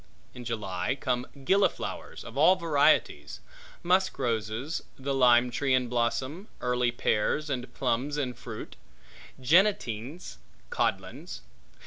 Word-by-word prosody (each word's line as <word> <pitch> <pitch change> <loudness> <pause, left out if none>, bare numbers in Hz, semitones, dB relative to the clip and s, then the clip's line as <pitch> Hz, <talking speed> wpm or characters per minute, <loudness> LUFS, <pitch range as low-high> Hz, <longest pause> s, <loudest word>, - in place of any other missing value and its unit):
In 125 - -9
July 105 0 -2
come 125 -1 -1 0.2
gilliflowers 195 +6 0
of - - -10
all 185 - +6
varieties; 165 -6 +1 0.4
musk 185 +2 +2
roses; 120 +3 -2 0.2
the 135 +1 -3
lime 125 -2 +5
tree 130 +2 +1
in 125 -1 0
blossom; 130 - -1
early 125 0 +1
pears 120 +6 0
and 125 -2 -4
plums 135 +3 -1
in 130 -4 -1
fruit; - - -9 0.6
jennetings, 135 - +1 0.3
codlins. - - -2
130 Hz, 110 wpm, -28 LUFS, 120-150 Hz, 0.6 s, all